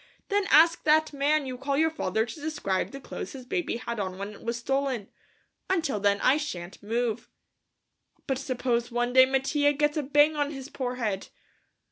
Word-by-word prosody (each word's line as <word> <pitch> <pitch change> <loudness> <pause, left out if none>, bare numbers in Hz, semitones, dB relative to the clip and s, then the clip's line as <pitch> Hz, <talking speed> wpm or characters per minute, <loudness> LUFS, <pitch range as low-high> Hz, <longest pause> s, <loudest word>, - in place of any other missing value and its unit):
Then 405 -1 +1
ask 330 +2 +6
that 310 0 +4
man 290 +1 +1
you 255 -1 -6
call 275 +1 -1
your 320 +1 +3
father 220 - -1
to 265 +6 -9
describe 290 -12 -1
the 275 - -8
clothes - - -7
his 260 -2 -9
baby 345 -2 -2
had 235 -1 -5
on 185 -2 -3
when 200 +1 -5
it - - -14
was 235 +1 -2
stolen. 265 -3 -1 0.6
Until 320 - 0
then 200 0 +2
I 270 - +4
shan't 185 - -6
move." 230 +2 -2 1.0
"But 265 -2 -1
suppose 245 -3 -1
one 240 +1 0
day 260 0 +8
Mattia 290 +2 +2
gets 295 +1 +1
a - - +2
bang 295 +2 +4
on 290 -1 0
his 270 -2 -7
poor 250 -2 -3
head?" 210 -6 -2
265 Hz, 185 wpm, -27 LUFS, 235-295 Hz, 1.0 s, day